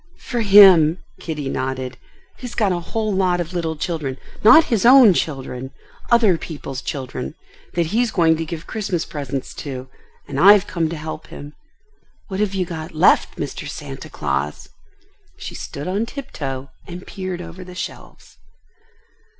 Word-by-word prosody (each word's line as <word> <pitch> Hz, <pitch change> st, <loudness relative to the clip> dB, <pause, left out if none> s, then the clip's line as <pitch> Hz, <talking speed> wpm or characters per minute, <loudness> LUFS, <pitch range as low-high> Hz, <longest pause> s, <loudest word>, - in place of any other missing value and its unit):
"For 240 Hz, -2 st, -3 dB
him," 190 Hz, -6 st, +7 dB, 0.2 s
Kitty 150 Hz, -4 st, -4 dB
nodded. 130 Hz, -1 st, -3 dB, 0.4 s
"He's 245 Hz, -2 st, -7 dB
got 210 Hz, -4 st, +2 dB
a 175 Hz, -, 0 dB
whole 215 Hz, +4 st, -2 dB
lot 185 Hz, -2 st, +1 dB
of 175 Hz, +1 st, -4 dB
little 165 Hz, -2 st, -2 dB
children—not 160 Hz, -, +3 dB
his 225 Hz, -8 st, 0 dB
own 245 Hz, -4 st, +8 dB
children—other 155 Hz, -, -1 dB
people's 140 Hz, -4 st, -6 dB
children—that 135 Hz, -, -5 dB
he's 225 Hz, +8 st, +1 dB
going 165 Hz, -5 st, +3 dB
to 165 Hz, -, -2 dB
give 165 Hz, 0 st, -7 dB
Christmas 195 Hz, -6 st, -2 dB
presents 140 Hz, -3 st, -5 dB
to, 130 Hz, -2 st, -6 dB, 0.4 s
and 135 Hz, -, -4 dB
I've 200 Hz, +4 st, +7 dB
come 165 Hz, -5 st, -1 dB
to 165 Hz, -, -5 dB
help 155 Hz, 0 st, -7 dB
him. 145 Hz, +1 st, -10 dB, 0.8 s
What 190 Hz, 0 st, -4 dB
have 205 Hz, -2 st, 0 dB
you 185 Hz, -1 st, 0 dB
got 160 Hz, 0 st, -7 dB
left, 155 Hz, -, +4 dB
Mr. -, -, -5 dB
Santa -, -, -8 dB
Claus?" 70 Hz, 0 st, -3 dB, 0.7 s
She -, -, -7 dB
stood 145 Hz, +3 st, -7 dB
on 200 Hz, +5 st, -1 dB
tiptoe 140 Hz, -, -6 dB, 0.2 s
and 180 Hz, +1 st, -8 dB
peered 185 Hz, -3 st, -5 dB
over 180 Hz, +1 st, -9 dB
the 180 Hz, 0 st, -11 dB
shelves. -, -, -8 dB
170 Hz, 145 wpm, -21 LUFS, 145-195 Hz, 0.8 s, own